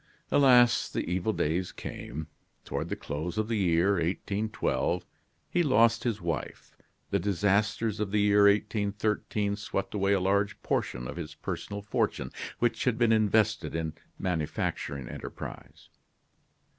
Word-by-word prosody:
Alas! 125 -4 +5
the - - -3
evil 90 +4 0
days 90 -1 -1
came. 75 +4 -6 0.4
Toward - - -3
the - - -1
close 80 +5 -4
of 110 0 0
the 115 -1 0
year 90 0 +3
1812, 100 +5 -1 0.4
he 175 - +1
lost 115 -5 +4
his 115 -4 0
wife, 85 -4 -4 0.4
the 100 - +2
disasters 105 +3 +1
of 105 -2 -1
the 105 +1 +1
year 105 0 +5
1813 105 0 +1
swept 100 -2 -3
away 100 -1 +2
a 100 - +3
large 100 +2 +1
portion 60 0 -1
of 65 - -7
his 80 -2 -6
personal 100 +5 -5
fortune, 85 -10 -1 0.3
which 120 -2 0
had 125 -3 +2
been 120 -1 +3
invested 110 -5 +2
in 80 -1 -1
a - - -7 0.3
manufacturing 75 -6 -2
enterprise. - - -8
100 Hz, 140 wpm, -29 LUFS, 85-110 Hz, 0.4 s, Alas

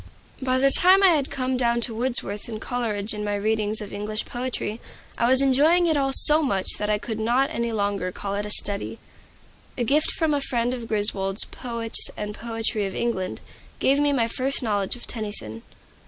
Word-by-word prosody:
By 255 0 0
the 275 +1 +3
time 375 +6 +8
I 385 - +7
had 295 -5 +1
come 260 -1 -2
down 235 -1 +1
to 235 - -3
Wordsworth 225 -3 -2
and 220 -2 -6
Coleridge 220 -4 -3
in 210 0 -5
my 205 0 -2
readings 215 +1 -1
of 205 - -9
English 210 +2 -4
poetry, 240 -3 -4 0.3
I 235 - +1
was 260 +1 +4
enjoying 305 +7 +3
it 320 -2 +2
all 275 -2 0
so 300 +3 +8
much 195 -10 -1
that 210 - -2
I 210 - +1
could 220 +1 -6
not 245 +5 0
any 235 0 -3
longer 200 -4 -2
call 200 +2 -6
it 205 +1 -3
study. 205 +2 -1 0.8
A 245 - -1
gift 290 +6 +1
from 320 -2 0
a 285 - -1
friend 245 -2 -2
of 240 -2 -7
Griswold's 205 -2 0
"Poets 235 -2 -2
and 210 0 -5
Poetry 225 -2 -3
of 190 - -8
England" 190 -6 -3 0.4
gave 275 +2 +2
me 290 0 +2
my 240 -5 +1
first 265 +3 -1
knowledge 205 -3 -1
of 245 - -11
Tennyson. 205 - -3
230 Hz, 195 wpm, -23 LUFS, 210-260 Hz, 0.8 s, time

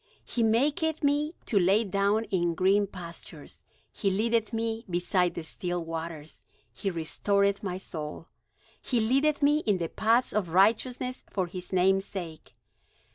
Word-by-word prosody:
He 240 - -2
maketh 290 +8 +1
me 295 +3 +1
to 205 - +2
lie 195 +5 +4
down 200 +2 +1
in 175 -2 +1
green 200 +3 +3
pastures; 175 -3 -10 0.3
He 200 - -1
leadeth 220 +3 +1
me 225 0 -2
beside 180 0 +1
the 170 - -4
still 175 +1 -3
waters, 165 -2 -7 0.3
He 195 - -3
restoreth 200 +4 +1
my 185 -3 -3
soul; 160 -4 -6 0.6
He 245 - 0
leadeth 275 +7 +2
me 295 +1 +4
in 210 -10 +1
the 170 -2 -3
paths 230 +3 +2
of 200 -4 0
righteousness 245 +7 +2
for 190 -3 -1
his 180 +1 -7
name's 190 +1 +3
sake. 170 -5 -8
200 Hz, 145 wpm, -28 LUFS, 175-230 Hz, 0.6 s, lie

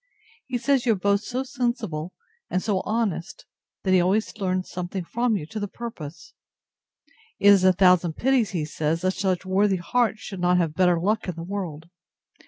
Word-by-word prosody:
He 255 - -1
says 265 0 +1
you 230 - +5
are 200 - -4
both 200 +1 +2
so 255 +3 -3
sensible, 235 - -3 0.4
and 185 - -1
so 205 -4 0
honest, 205 -5 -2 0.4
that 190 - +1
he 185 - +5
always 200 +6 +1
learns 185 -2 -1
something 180 +1 -4
from 235 +3 0
you 180 - -3
to 215 +7 -6
the 205 - -2
purpose. 185 -9 -8 1.0
It 205 - +5
is 200 -2 +6
a 185 - +7
thousand 180 -2 +4
pities, 255 0 +2
he 165 -5 -2
says, 160 +2 -1
that 185 +1 +2
such 190 -1 -1
worthy 190 +1 +2
hearts 225 +5 0
should 195 -4 -7
not 180 0 +3
have 165 -4 +1
better 180 0 +3
luck 210 +5 0
in 180 - -3
the 165 - -6
world! 175 -5 -5
190 Hz, 190 wpm, -24 LUFS, 175-220 Hz, 1.0 s, a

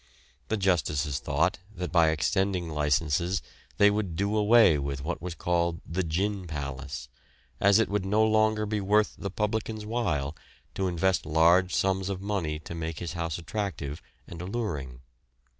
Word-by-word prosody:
The 110 - 0
justices 75 -7 +1
thought - - 0 0.2
that 90 0 -4
by 85 -3 +5
extending 90 +3 0
licences 75 +4 0 0.3
they 100 0 +6
would 100 -5 -2
do 100 +4 0
away 105 -7 +5
with 70 -1 -4
what 85 +2 -3
was 90 0 -5
called 85 -1 0
the 85 +4 -2
"gin 95 +3 -1
palace," 70 -3 -5 0.5
as 100 0 +5
it 115 - +3
would 100 -1 -1
no 105 +3 +2
longer 110 0 +3
be 105 0 -1
worth 105 +2 +2
the 100 - -5
publican's 105 +2 -2
while 85 - -1 0.4
to 95 - -1
invest 90 +1 +1
large 85 +4 +4
sums 95 0 +1
of 95 -2 -3
money 95 -6 -2
to 80 - -8
make 80 -1 -4
his 85 -1 -5
house 85 -3 -3
attractive 85 -5 -4 0.2
and 85 -1 -9
alluring. 80 - -4
90 Hz, 160 wpm, -28 LUFS, 80-100 Hz, 0.5 s, they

